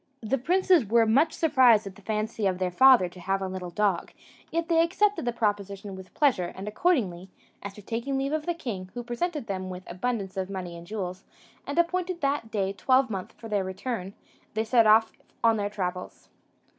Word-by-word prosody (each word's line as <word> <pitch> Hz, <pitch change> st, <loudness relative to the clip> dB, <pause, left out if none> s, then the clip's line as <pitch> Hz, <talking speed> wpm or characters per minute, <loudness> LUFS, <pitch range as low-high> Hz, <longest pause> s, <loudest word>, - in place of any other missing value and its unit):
The 250 Hz, +5 st, 0 dB
princes 360 Hz, +2 st, +3 dB
were 230 Hz, +2 st, +3 dB
much 275 Hz, +9 st, +3 dB
surprised 260 Hz, -10 st, +4 dB
at 195 Hz, -, -7 dB
the 205 Hz, -, -17 dB
fancy 215 Hz, 0 st, -2 dB
of 185 Hz, -1 st, 0 dB
their 185 Hz, -1 st, -1 dB
father 255 Hz, -1 st, +6 dB
to 175 Hz, +1 st, -13 dB
have 195 Hz, +2 st, -1 dB
a 190 Hz, -, -3 dB
little 185 Hz, -1 st, -5 dB
dog, 195 Hz, -1 st, 0 dB, 0.4 s
yet 335 Hz, 0 st, -1 dB
they 330 Hz, -1 st, +4 dB
accepted 400 Hz, +1 st, +1 dB
the 240 Hz, -, +1 dB
proposition 200 Hz, -3 st, -2 dB
with 190 Hz, 0 st, -12 dB
pleasure; 245 Hz, -, +2 dB
and 195 Hz, +2 st, -7 dB
accordingly, 210 Hz, -, 0 dB, 0.3 s
after 200 Hz, +1 st, -8 dB
taking 235 Hz, +6 st, -2 dB
leave 275 Hz, +2 st, -1 dB
of 310 Hz, 0 st, -2 dB
the 345 Hz, -, 0 dB
king, 200 Hz, -, -5 dB
who 240 Hz, -, -4 dB
presented 285 Hz, +4 st, -3 dB
them 185 Hz, -3 st, -4 dB
with 185 Hz, 0 st, -7 dB
abundance 195 Hz, +1 st, -3 dB
of 190 Hz, 0 st, -2 dB
money 185 Hz, -3 st, -5 dB
and 170 Hz, 0 st, -11 dB
jewels, 185 Hz, -3 st, -5 dB, 0.4 s
and 285 Hz, -, -4 dB
appointed 355 Hz, 0 st, 0 dB
that 275 Hz, -5 st, 0 dB
day 195 Hz, -3 st, -1 dB
twelvemonth 225 Hz, -2 st, +1 dB
for 225 Hz, -, -11 dB
their 205 Hz, -3 st, 0 dB
return, 190 Hz, +1 st, -5 dB, 0.4 s
they 220 Hz, -, +1 dB
set 225 Hz, 0 st, +4 dB
off 220 Hz, +1 st, +5 dB, 0.3 s
on 225 Hz, -1 st, +4 dB
their 205 Hz, -1 st, -1 dB
travels. 180 Hz, -3 st, -5 dB
215 Hz, 195 wpm, -27 LUFS, 190-270 Hz, 0.4 s, father